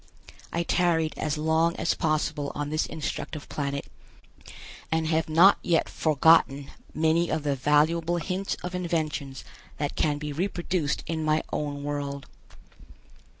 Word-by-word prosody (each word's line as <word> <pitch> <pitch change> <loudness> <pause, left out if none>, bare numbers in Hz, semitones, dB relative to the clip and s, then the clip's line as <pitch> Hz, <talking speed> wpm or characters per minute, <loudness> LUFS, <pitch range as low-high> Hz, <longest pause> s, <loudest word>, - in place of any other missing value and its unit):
I 170 - 0
tarried 165 -2 +1
as 155 0 -2
long 160 +2 +2
as - - 0
possible 155 -3 -1
on 145 0 -3
this 155 +1 0
instructive 155 0 -5
planet 140 -1 -3 1.1
and 160 0 +1
have 160 0 0
not 175 +6 +6
yet 170 -2 +1
forgotten 150 -2 +3 0.2
many 160 +2 +2
of 160 -2 -1
the 145 -2 0
valuable 155 +5 +2
hints 185 +4 -2
of 180 0 -4
inventions 155 -6 -2 0.3
that 145 -1 -3
can 150 -2 +1
be 150 0 -5
reproduced 175 -2 -1
in 160 -1 -2
my 155 0 +2
own 145 -1 -3
world. 140 -1 -4
155 Hz, 135 wpm, -27 LUFS, 145-165 Hz, 1.1 s, not